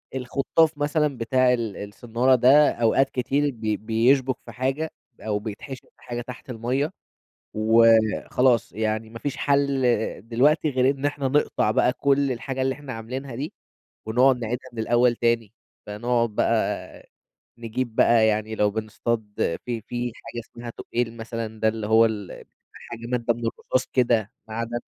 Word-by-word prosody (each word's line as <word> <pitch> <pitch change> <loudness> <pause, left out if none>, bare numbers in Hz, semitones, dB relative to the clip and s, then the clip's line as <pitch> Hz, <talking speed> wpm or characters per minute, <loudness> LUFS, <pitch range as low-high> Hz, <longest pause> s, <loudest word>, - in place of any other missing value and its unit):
الخُطّاف 140 +5 +1
مثلًا 150 -2 0
بتاع 125 +2 +2
ال 115 -4 -3
الصنّارة 120 +5 +1
ده 135 +5 +6
أوقات 120 +4 +2
كتير 140 +3 0
ب 115 - -18
بيشبُك 115 +5 +2
في - - -9
حاجة 135 +5 -2 0.3
أو 105 -1 -1
بيتحشر 115 +5 -8
في - - -27
حاجة 120 0 -4
تحت 125 +1 -10
المَيّة 125 +7 -1 0.6
وخلاص، 115 +2 +3
يعني 110 +1 -2
ما 115 - -9
فيش 145 +3 -4
حل 140 -1 +1 0.5
دلوقتي 150 +6 +3
غير 130 0 +3
إن 135 - -9
إحنا 145 -1 0
نقطع 140 -5 +1
بقى 125 +3 +3
كل 140 0 +1
الحاجة 130 +2 -4
اللي 130 0 0
إحنا 145 -3 -8
عاملينها 125 +4 -6
دي 140 +6 -5 0.5
ونُقعد 125 +4 +4
نعيدها 125 +3 -4
من 120 - -11
الأول 120 +2 +3
تاني. 115 -3 0 0.3
فنُقعد 115 +2 0
بقى - - -1 0.5
نجيب 115 0 -4
بقى 115 -2 +5
يعني 110 0 0
لو 105 -1 +2
بنصطاد 110 +1 -2 0.4
في 120 -2 -3
في 120 0 -3
حاجة 120 - -8
اسمها 120 +1 -9
تُقّيل 115 0 -3
مثلًا، 115 -1 -6
ده 110 - +3
اللي 110 -1 -3
هو 110 +1 +5
ال 105 -4 -6 0.3
حاجة 115 -1 -9
مادة 120 -1 0
من 120 - -10
الرصاص 130 +2 -1
كده، 115 -5 +2 0.2
معدن، 115 +2 -3
120 Hz, 150 wpm, -24 LUFS, 110-130 Hz, 0.6 s, ده